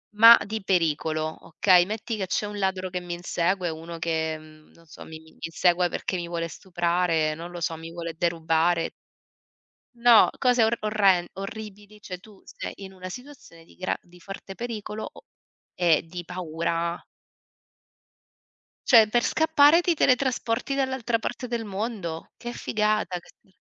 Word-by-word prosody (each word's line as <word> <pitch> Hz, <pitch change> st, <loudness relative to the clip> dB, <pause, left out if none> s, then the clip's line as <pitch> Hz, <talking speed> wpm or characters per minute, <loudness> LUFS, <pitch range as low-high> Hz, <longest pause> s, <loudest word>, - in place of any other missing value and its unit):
ma 230 Hz, +2 st, +10 dB
di 220 Hz, +1 st, -4 dB
pericolo, 160 Hz, -3 st, 0 dB
okay? 175 Hz, +2 st, +4 dB
Metti 220 Hz, +2 st, -4 dB
che 190 Hz, -, -3 dB
c'è 210 Hz, -, -1 dB
un 205 Hz, 0 st, -6 dB
ladro 190 Hz, -1 st, -1 dB
che 180 Hz, -, -3 dB
mi 175 Hz, -1 st, -6 dB
insegue 175 Hz, +1 st, -1 dB
o 160 Hz, -, -4 dB
uno 165 Hz, +1 st, -8 dB
che, 160 Hz, -1 st, -1 dB
uhm, 155 Hz, 0 st, -17 dB
non 165 Hz, -, -21 dB
so, 155 Hz, -, -12 dB
mi 160 Hz, 0 st, -10 dB, 0.2 s
insegue 175 Hz, +2 st, +2 dB
perché 185 Hz, -, -3 dB
mi 170 Hz, -, -4 dB
vuole 170 Hz, -1 st, -3 dB
stuprare, 170 Hz, -3 st, 0 dB
non 170 Hz, +2 st, -8 dB
lo 175 Hz, -, -7 dB
so, 165 Hz, 0 st, -2 dB
mi 165 Hz, +1 st, -9 dB
vuole 170 Hz, -1 st, -5 dB
derubare. 165 Hz, 0 st, +1 dB, 1.0 s
No, 235 Hz, -1 st, +6 dB
cose 250 Hz, -2 st, +4 dB
or 225 Hz, +1 st, +3 dB
orren 200 Hz, -4 st, +3 dB
orribili, 210 Hz, +1 st, -8 dB
cioè 180 Hz, -3 st, -7 dB
tu 205 Hz, 0 st, -18 dB
sei -, -, -7 dB
in 190 Hz, -1 st, -10 dB
una 185 Hz, 0 st, -8 dB
situazione 250 Hz, -, -12 dB
di -, -, -21 dB
gra 185 Hz, -, -2 dB
di 175 Hz, 0 st, -19 dB
forte 195 Hz, +1 st, -9 dB
pericolo 220 Hz, -2 st, -5 dB
o -, -, -15 dB, 0.5 s
e 170 Hz, -3 st, +3 dB
di 175 Hz, +1 st, -7 dB
paura. 170 Hz, -1 st, -3 dB, 1.8 s
Cioè 225 Hz, -3 st, +8 dB
per 240 Hz, +2 st, +1 dB
scappare 315 Hz, 0 st, +5 dB
ti 350 Hz, 0 st, +2 dB
teletrasporti 255 Hz, -2 st, +1 dB
dall'altra 260 Hz, -4 st, 0 dB
parte 245 Hz, +3 st, -5 dB
del 235 Hz, -1 st, -3 dB
mondo. 195 Hz, -5 st, -5 dB
Che 240 Hz, 0 st, -7 dB
figata 215 Hz, -5 st, 0 dB
ques 190 Hz, +2 st, -23 dB
185 Hz, 155 wpm, -25 LUFS, 170-220 Hz, 1.8 s, ma